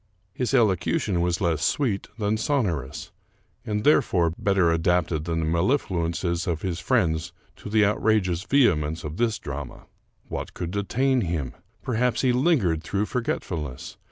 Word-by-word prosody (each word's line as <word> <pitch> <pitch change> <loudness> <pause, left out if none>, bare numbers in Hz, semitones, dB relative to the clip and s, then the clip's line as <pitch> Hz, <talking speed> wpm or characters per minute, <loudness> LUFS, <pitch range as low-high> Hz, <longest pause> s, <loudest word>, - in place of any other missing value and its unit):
His 125 +4 -1
elocution 95 -4 +2
was 90 0 0
less 85 -3 +1
sweet 110 - 0
than 105 -1 0
sonorous, 95 - -2 0.5
and, 105 0 -2
therefore, 85 - +3
better 95 -4 +2
adapted 85 -1 +1
than 85 -1 -1
the - - -1
mellifluences 85 - 0
of 85 -3 -2
his 90 -3 -2
friend 80 -7 +1 0.3
to - - -8
the 105 0 +4
out 105 - 0
rageous 95 -5 +1
vehemence 80 - +2
of 75 +2 -6
this 115 -3 +1
drama. 70 -2 -7 0.4
What - - -6
could 85 -1 -4
detain 125 +6 +1
him? 80 - -2 0.3
Perhaps 125 0 0
he 130 - +3
lingered 125 - +2
through 100 +5 -1
forgetfulness. 90 - -4
90 Hz, 145 wpm, -25 LUFS, 80-110 Hz, 0.5 s, the